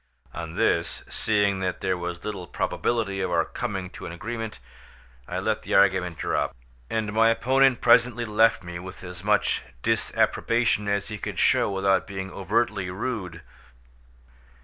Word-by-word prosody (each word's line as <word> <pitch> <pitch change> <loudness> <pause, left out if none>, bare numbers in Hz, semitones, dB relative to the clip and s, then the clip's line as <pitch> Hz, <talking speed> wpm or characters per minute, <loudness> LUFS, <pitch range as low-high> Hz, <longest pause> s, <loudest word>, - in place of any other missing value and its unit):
On 80 0 -6
this, - - +1
seeing 100 -3 +1
that 95 -1 -2
there 95 - +1
was 85 -1 -5
little 100 -4 -5
probability 100 -2 -1
of 95 - -1
our 85 -2 +2
coming 95 -6 -4
to - - -8
an - - -6
agreement, 110 +5 -5 0.7
I - - -4
let - - 0
the - - -2
argument 95 -3 +3
drop, - - -1 0.3
and 110 -2 -1
my 115 +1 +5
opponent 130 +2 +3
presently 120 0 +4
left 110 -1 +3
me 85 0 -6
with 95 +1 -9
as 90 0 -8
much 105 0 +2 0.2
disapprobation 115 -3 +1
as 100 0 -1
he 105 -1 -5
could - - -5
show - - +3
without 95 -1 +1
being 95 -1 -5
overtly 100 -1 0
rude. 90 - -4
100 Hz, 150 wpm, -25 LUFS, 90-115 Hz, 0.7 s, my